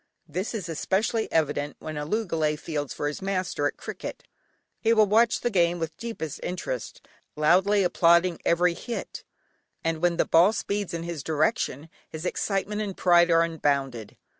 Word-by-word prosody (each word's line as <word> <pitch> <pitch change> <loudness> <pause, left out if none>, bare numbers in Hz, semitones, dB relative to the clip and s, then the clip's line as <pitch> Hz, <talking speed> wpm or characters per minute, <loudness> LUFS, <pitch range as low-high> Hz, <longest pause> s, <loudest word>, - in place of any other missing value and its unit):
This 190 +6 -3
is 195 -6 -4
especially 200 +7 -1
evident 145 -2 0
when 155 0 -7
a 150 0 -4
loogalay 165 -7 0
fields 150 -3 -4
for 145 - -3
his 145 - -4
master 185 -6 -1
at - - -6
cricket. - - -7 0.6
He 230 0 +3
will 215 -1 +5
watch 220 +3 +3
the 240 - 0
game 175 -3 +2
with 160 -1 -4
deepest 225 -11 -5
interest, 175 -9 -5 0.3
loudly 190 +7 +3
applauding 170 0 +3
every 175 +1 +3
hit, 235 +7 -6 0.6
and 165 -1 -1
when 175 -1 +2
the - - +3
ball 175 +6 +5
speeds 200 -3 -2
in 165 - -4
his 170 -3 -5
direction 155 -1 0 0.2
his 160 +2 -7
excitement 205 +2 -1
and 200 -3 -4
pride 175 -1 +5
are 165 0 +5
unbounded. 140 -8 -1
170 Hz, 165 wpm, -26 LUFS, 155-195 Hz, 0.6 s, will